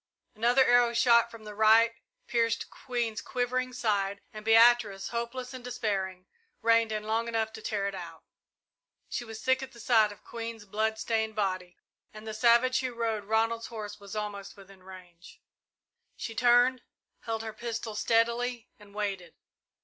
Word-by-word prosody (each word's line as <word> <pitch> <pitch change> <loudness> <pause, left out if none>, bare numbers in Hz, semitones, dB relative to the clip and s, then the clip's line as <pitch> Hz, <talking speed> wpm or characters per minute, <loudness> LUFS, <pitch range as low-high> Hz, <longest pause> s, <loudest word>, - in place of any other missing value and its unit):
Another 240 +4 +3
arrow, 245 -1 +4
shot 235 -1 +5
from 230 -2 -12
the 210 -1 -8
right, 220 +2 +5 0.3
pierced 230 -1 0
Queen's 235 -3 -3
quivering 255 +1 -2
side, 200 -5 -1
and 215 0 -8
Beatrice, 225 -3 +4
hopeless 240 +2 -4
and 255 -1 -8
despairing, 190 -6 -3 0.4
reined 230 -1 +4
in 215 -1 -2
long 225 +2 -1
enough 225 -1 -1
to 220 - -9
tear 205 -2 -2
it 200 - -4
out. 170 -3 -9 0.9
She - - -3
was 225 -1 -9
sick 260 +3 +1
at 265 0 -8
the 235 - -14
sight 220 -3 +3
of 205 - -14
Queen's 230 -2 -7
blood 220 +2 -1
stained 220 -1 -1
body 185 -3 -2 0.4
and 215 +1 -10
the 220 - -5
savage 235 +3 +4
who 255 -2 -3
rode 225 -3 -2
Ronald's 225 +2 0
horse 210 -2 -7
was 200 0 -10
almost 205 -1 -5
within 195 -1 -15
range. 180 -2 -14 0.8
She 225 - -6
turned, 245 +2 +4 0.4
held 225 -1 -4
her 220 -1 -6
pistol 230 0 -5
steadily, 235 +2 0
and 205 -1 -17
waited. 195 -5 -4
225 Hz, 160 wpm, -29 LUFS, 210-235 Hz, 0.9 s, shot